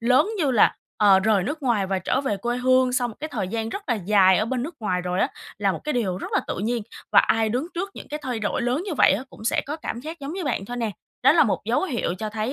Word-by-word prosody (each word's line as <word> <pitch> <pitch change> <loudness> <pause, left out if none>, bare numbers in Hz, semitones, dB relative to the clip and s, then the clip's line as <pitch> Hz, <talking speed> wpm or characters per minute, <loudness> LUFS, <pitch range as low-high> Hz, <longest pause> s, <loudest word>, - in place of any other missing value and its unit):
lớn 255 - +3
như 300 -6 +2
là, 240 - +4 0.2
ờ, 200 -2 +6
rời 210 -2 +2
nước 295 - -4
ngoài 225 -7 +1
và 190 0 -1
trở 220 +8 0
về 265 -8 -1
quê 240 +5 -2
hương 255 0 +3
sau 250 -1 +1
một 225 - -9
cái 310 - -4
thời 210 -9 -3
gian 225 +1 -2
rất 400 - -5
là 245 - +2
dài 195 -2 +4
ở 215 - +1
bên 245 +1 -2
nước 325 +4 -5
ngoài 180 -4 0
rồi 180 +1 -2
á, - - +2 0.3
là 200 -2 +2
một - - -6
cái 300 - -1
điều 195 -7 -1
rất - - -7
là - - +3
tự - - -4
nhiên 230 +3 -1 0.3
và - - +7
ai 225 -1 +2
đứng 250 +8 -1
trước 380 +4 -3
những - - -10
cái 300 +1 -5
thay 250 -4 -3
đổi 215 +3 -1
lớn 250 +7 0
như 350 - -2
vậy - - +5
á, 210 +7 -1
cũng 215 - -13
sẽ 230 - +2
có 295 - -3
cảm 240 -6 -5
giác 320 +5 -8
giống 280 +2 -5
như 370 0 -4
bạn 245 -8 -1
thôi 245 +4 -6
nè. 230 -3 -1 0.3
Đó 270 - +7
là 335 - +5
một - - -1
dấu - - +1
hiệu 240 - -2
cho 215 -1 -4
thấy 220 +3 -2
240 Hz, 300 wpm, -24 LUFS, 210-270 Hz, 0.3 s, và